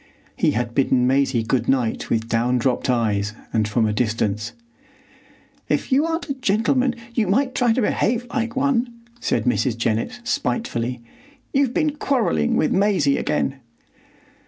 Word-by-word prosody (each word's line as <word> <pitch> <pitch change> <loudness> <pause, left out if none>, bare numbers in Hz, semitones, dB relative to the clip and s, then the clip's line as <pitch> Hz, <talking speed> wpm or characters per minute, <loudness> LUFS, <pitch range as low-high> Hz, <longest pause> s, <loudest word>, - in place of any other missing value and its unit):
He - - +2
had 120 -1 -2
bidden 130 -2 +2
Maisie 130 -2 +2
good 125 +3 0
night 125 -4 0
with 110 0 0
down 120 +2 +1
dropped 125 +2 0
eyes 105 -4 0 0.2
and 110 -2 +1
from 110 +2 +1
a 105 - 0
distance. 110 0 -1 1.2
"If 150 - -1
you 285 +5 +3
aren't 330 +1 -2
a 280 - -1
gentleman 250 +1 +1 0.2
you 225 -4 +1
might 255 +7 +1
try 245 -2 +2
to 250 +3 +1
behave 235 +3 0
like 235 -2 -2
one," 260 -3 +1 0.3
said - - 0
Mrs. 125 -1 +1
Jennett, 115 - -1
spitefully. 125 - -2 0.5
"You've 270 -3 +1
been 305 -3 0
quarrelling 225 - +1
with 155 - +2
Maisie 185 -8 +2
again." 140 -2 -1
140 Hz, 150 wpm, -22 LUFS, -, 1.2 s, you